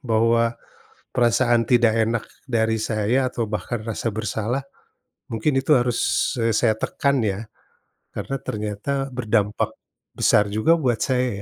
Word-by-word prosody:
bahwa 115 -1 +2 0.5
perasaan 120 -1 +2
tidak 120 -2 +4
enak 115 +1 +1 0.2
dari 110 -3 +1
saya 110 +4 0
atau 115 -3 -3
bahkan 110 +2 -3
rasa 115 0 -3
bersalah, 110 +4 -2 0.7
mungkin 115 +6 0
itu 150 +2 +4
harus, 120 +2 0
eee, 115 - +2
saya 110 -3 +3
tekan, 140 +3 0
ya? 105 +1 -2 0.6
Karena 135 - -5
ternyata 110 +6 -3
berdampak 110 -4 0 0.4
besar 105 -1 +3
juga 110 +11 +3
buat 125 -8 0
saya 125 -1 +1
115 Hz, 125 wpm, -23 LUFS, 110-125 Hz, 0.7 s, tidak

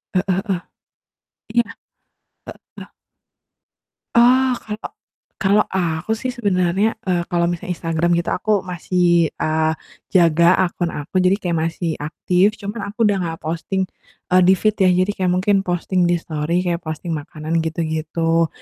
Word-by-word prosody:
Heeh 185 - +2 0.2
heeh. 185 -4 -1 0.9
Iya, 235 0 +2 0.8
heeh. - - -12 1.3
Ah, 255 +2 +5
kalo 210 -1 -6 0.7
kalo 200 +2 +4 0.2
aku 170 +1 -1
sih 255 - -2
sebenarnya, 190 -1 +1 0.2
eee, 180 -2 0
kalo 175 -1 +1
misalnya 175 +1 -4
Instagram 165 0 -1
gitu, 170 0 -1
aku 215 - -1 0.2
masih, 180 +1 -1 0.4
eee, 155 0 +1 0.4
jaga 170 -2 +5 0.2
akun 175 -1 -2
aku, 145 +5 -8
jadi 185 +1 +4
kayak 175 -2 -1
masih 165 +1 -3
aktif, 180 +6 +1
cuman 205 +2 -5
aku - - -53
udah 205 -1 +2
nggak 165 -2 -4
posting, 170 +4 -2 0.5
eee, 185 - +6
di 190 - +7
feed 215 -1 +2
ya, - - +5
jadi 185 +2 +2
kayak 185 -1 +1
mungkin 200 +2 +2
posting 175 +1 0
di 175 - +3
stori 160 +3 -1
kayak 170 -1 0
posting 155 +2 -5
makanan 155 +1 -3
gitu-gitu. 165 0 0
175 Hz, 140 wpm, -20 LUFS, 165-190 Hz, 1.3 s, di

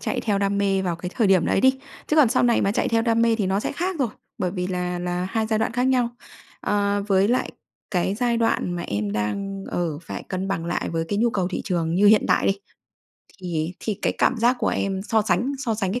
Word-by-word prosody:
chạy - - -2
theo 205 -3 0
đam 200 0 0
mê 195 -1 +1
vào 175 -2 -1
cái 180 +1 -6
thời 225 - +2
điểm 190 -4 +4
đấy - - +2
đi, 265 +1 +4 0.3
chứ 305 - 0
còn 295 -6 +6
sau 255 - +2
này 240 -1 +3
mà 200 - +1
chạy - - 0
theo 225 0 +2
đam 230 -1 +2
mê 230 -1 +4
thì 205 - 0
nó 195 +2 +1
sẽ - - -3
khác 360 +4 -2
rồi, 260 -5 +1 0.3
bởi 180 - 0
vì 180 -1 -3
là 180 -1 -2
là 180 +1 -2
hai 220 0 0
giai 220 -1 0
đoạn 220 - 0
khác 245 +1 0
nhau. 255 -2 +2 0.5
Ờ, 205 0 0
với 195 +1 +3
lại 250 +2 +1 0.4
cái 190 0 0
giai 240 +1 0
đoạn 225 -5 +1
mà 175 - -3
em 100 -6 -2
đang, 195 - -3
ờ, 165 -4 -2
phải 165 - -6
cân 190 +1 -3
bằng 165 -4 -2
lại 175 - -2
với 165 -1 -1
cái 205 - -1
nhu 235 +2 +3
cầu 190 -5 -1
thị 190 - -3
trường 170 -5 -1
như 205 +3 +4
hiện 215 0 +6
tại - - +3
đi, 195 0 +1 0.8
thì 170 0 -2
thì 215 -3 -3
cái - - +2
cảm - - +3
giác 240 +3 +3
của - - 0
em 190 -1 -1
so 220 +1 +1
sánh 250 +5 +1
so 230 -5 -1
sánh 195 -3 -1
cái 245 - -2
200 Hz, 260 wpm, -23 LUFS, 180-230 Hz, 0.8 s, còn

